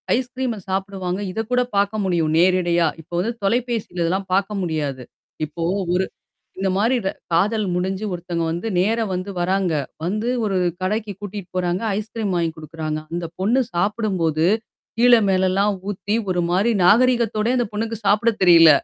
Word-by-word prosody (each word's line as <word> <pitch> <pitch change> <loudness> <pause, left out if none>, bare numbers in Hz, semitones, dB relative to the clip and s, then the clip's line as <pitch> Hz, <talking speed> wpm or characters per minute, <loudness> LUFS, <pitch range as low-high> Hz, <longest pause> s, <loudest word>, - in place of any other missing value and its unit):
ஐஸ்கிரீம்ம 250 -2 -2
சாப்பிடுவாங்க 190 -1 -2
இதக் 225 +3 -4
கூடப் 250 -2 0
பார்க்க 200 +2 +1
முடியும் 170 -4 +1
நேரடியா. 175 -2 +3
இப்ப 165 - -27
வந்து 220 +6 0
தொலைபேசியில 230 -4 -1
இதெல்லாம் 190 +3 -1
பார்க்க 200 +2 +1
முடியாது. 150 -7 -2 0.4
இப்போ 165 +3 -6 0.3
ஒரு 185 +1 +2 0.5
இந்த 195 - +1
மாதிரி 230 +5 +2
ர - - +2 0.2
காதல் 205 +6 +2
முடிஞ்சு 190 +3 -1
ஒருத்தவங்க 170 -1 -3
வந்து 175 +7 -3
நேரா 225 +5 +2
வந்து 185 +2 -3
வராங்க. 185 0 +1 0.3
வந்து 215 +6 -1 0.2
ஒரு 195 -2 0 0.2
கடைக்குக் 205 0 -2
கூட்டிட்டு 200 -2 -7
போறாங்க. 180 +1 0 0.2
ஐஸ்கிரீம் 215 -2 -3
வாங்கி 170 -1 +1
கொடுக்கிறாங்க. 155 0 -4
அந்தப் 170 -1 -4
பொண்ணு 235 +7 +3
சாப்பிடும்போது, 175 -5 0 0.5
கீழ 245 +1 +6 0.2
மேல 190 0 +3
எல்லாம் 200 +2 +2 0.2
ஊத்தி 205 +2 -2 0.2
ஒருமாரி 180 +6 +1
நாகரிகத்தோடே 235 +2 +3
அந்தப் 235 -3 -1
பொண்ணுக்கு 225 +2 -2
சாப்பிட 210 +4 +4
தெரியல. 165 -2 +8
195 Hz, 145 wpm, -21 LUFS, 175-215 Hz, 0.5 s, தெரியல